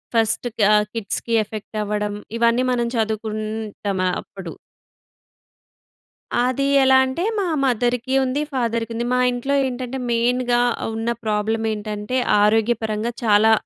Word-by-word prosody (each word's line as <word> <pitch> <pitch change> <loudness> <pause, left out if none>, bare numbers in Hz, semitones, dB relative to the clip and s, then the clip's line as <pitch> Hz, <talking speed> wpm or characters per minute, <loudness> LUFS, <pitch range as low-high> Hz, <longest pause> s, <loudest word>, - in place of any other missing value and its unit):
First 225 +1 +2
కా 210 - +3
ఆహ్, 210 0 +3
కిడ్స్‌కి 230 +1 -3
ఎఫెక్టవ్వడం. 210 -1 -3 0.2
ఇవన్నీ 235 +2 +3
మనం 240 -1 0
చదువుకుంటామాప్పుడు. 215 -4 -3 1.9
అది 260 +2 0 0.2
ఎలా 265 0 +6
అంటే, 260 +7 -3 0.2
మా 385 - 0 0.2
మదర్‌కి 245 +1 0
ఉంది, 260 +3 -1
ఫాదర్‌కుంది. 230 -1 -1
మా 250 - +2
ఇంట్లో 260 +3 -1
ఏంటంటే, 255 0 -4
మెయిన్‌గా 240 +1 +2 0.3
ఉన్న 225 +1 -2 0.2
ప్రాబ్లమేంటంటే, 215 +1 -1 0.3
ఆరోగ్యపరంగా 220 +1 +1
చాలా, 215 0 +5
225 Hz, 100 wpm, -21 LUFS, 210-245 Hz, 1.9 s, ఎలా